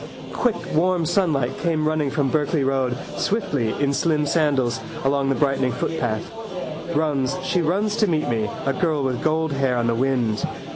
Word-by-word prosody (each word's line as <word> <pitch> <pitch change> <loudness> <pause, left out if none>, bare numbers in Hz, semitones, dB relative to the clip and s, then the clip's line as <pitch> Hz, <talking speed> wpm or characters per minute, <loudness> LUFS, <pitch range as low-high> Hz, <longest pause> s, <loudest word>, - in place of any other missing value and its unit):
Quick 245 -3 +1 0.2
warm 175 +1 +2
sunlight 155 -8 +1
came 160 -3 +1
running 155 -2 +1
from 140 -1 0
Berkeley 150 -1 +1
road, 130 -2 0 0.2
swiftly, 145 - 0
in 140 -1 +2
slim 150 0 +1
sandals, 140 -6 +1 0.2
along 135 0 +1
the 135 - +2
brightening 135 -3 +1
footpath. 120 -9 -2 0.6
Runs, 145 -1 +1
she 180 -1 +1
runs 200 +6 +1
to 215 - +3
meet 155 -4 +1
me, 110 -3 0 0.2
a 135 - +2
girl 160 -6 0
with 130 -2 -1
gold 160 0 +1
hair 135 -2 +1
on 120 - +1
the 115 - +2
wind. 120 -3 0
145 Hz, 165 wpm, -23 LUFS, 130-160 Hz, 0.6 s, to